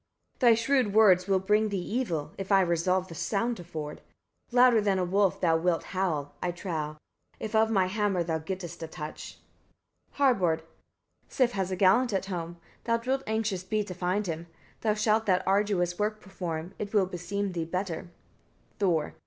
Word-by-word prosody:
Thy 240 -3 +6
shrewd 230 -2 +1
words 190 -4 +6
will 195 -1 +3
bring 210 +3 +2
thee 200 - -2
evil, 180 - -2
if 195 +1 -5
I 195 -1 +6
resolve 180 +1 +1
the 170 - -9
sound 225 +8 -1
to 175 - -8
ford. 155 -3 -7 0.5
Louder 245 -2 +6
than 200 -2 +1
a 185 - +1
wolf 195 +1 +2
thou 165 -2 +3
wilt 170 0 0
howl, 155 -7 -1
I 180 - 0
trow, 160 -4 -4 0.4
if 220 - -5
of 220 0 +4
my 195 -4 +3
hammer 195 -2 0
thou 160 -1 -1
gettest 175 0 -6
a 165 - -4
touch. 155 -1 -8 0.8
Harbard. 190 - +2 0.7
48. - - -37
Sif 255 -3 +2
has 190 -4 -2
a 185 - -1
gallant 205 +6 +4
at 195 - 0
home; 175 -3 -5 0.3
thou 230 0 +2
wilt 265 +1 +1
anxious 220 -4 -1
be 210 +3 -1
to 190 - -7
find 185 +3 -1
him: 165 -1 -4 0.3
thou 215 -2 +1
shalt 215 +1 +1
that 185 -2 +3
arduous 195 -3 +1
work 215 +1 0
perform; 175 -3 -5
it 210 +1 -4
will 200 -2 +5
beseem 185 +3 -3
thee 170 -2 -2
better. 180 +1 -4 0.7
Thor. 170 -7 +1
190 Hz, 180 wpm, -28 LUFS, 175-210 Hz, 0.8 s, Thy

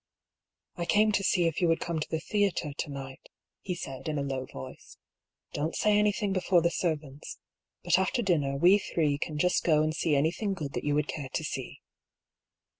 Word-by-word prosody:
" - - -60
I - - 0
came 215 +4 +4
to 205 -1 +1
see 185 -3 +2
if 165 0 0
you 175 - +4
would 165 0 +2
come 170 -2 -2
to 150 - -4
the 160 - -1
theatre, 195 -7 0
to 150 - -4
night," 135 -1 -8 0.3
he 180 - -3
said, 135 -5 -7
in 155 -1 -1
a 140 - -1
low 135 -2 -3
voice. 65 - -10 0.3
" - - -43
Don't 155 +3 -2
say 210 -1 +3
any 210 0 +4
thing 205 -1 -2
before 180 -2 +2
the 170 - +2
servants 150 -5 -3 0.2
— - - -59
but - - +3
after 190 +6 0
dinner, 145 -8 +1
we 180 +7 +6
three 150 -7 0
can 155 0 -3
just 180 +4 +2
go 155 -2 +4
and 155 0 0
see 160 -2 +1
anything 175 +8 0
good 145 -6 -5
that - - -3
you 145 0 +1
would 150 0 +1
care 140 -4 -5
to - - -2
see." - - -5
160 Hz, 220 wpm, -29 LUFS, 145-190 Hz, 0.3 s, we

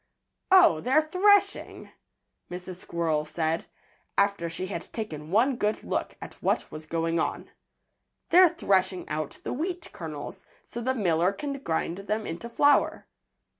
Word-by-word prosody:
"Oh! 365 - +7
they're 270 - +3
threshing!" 395 +5 +2 0.6
Mrs. 180 0 -7
Squirrel 165 -4 -1
said, 160 +1 -2 0.5
after 200 -4 +2
she 165 +3 -5
had 185 -3 -6
taken 155 -9 -6
one 240 +7 +3
good 210 -1 -1
look - - -3
at - - -10
what - - 0
was 155 0 -9
going 165 +1 0
on. - - -3 0.8
"They're 360 +1 +7
threshing 190 - 0
out 150 -1 -3
the - - -3
wheat 345 +5 -4
kernels, 160 +4 -8 0.2
so 235 - -7
the 260 +2 0
miller 180 -4 +2
can 280 +8 -4
grind 170 -4 -2
them 210 +2 -2
into 175 +8 -6
flour." 285 +4 +3
190 Hz, 140 wpm, -27 LUFS, 165-260 Hz, 0.8 s, Oh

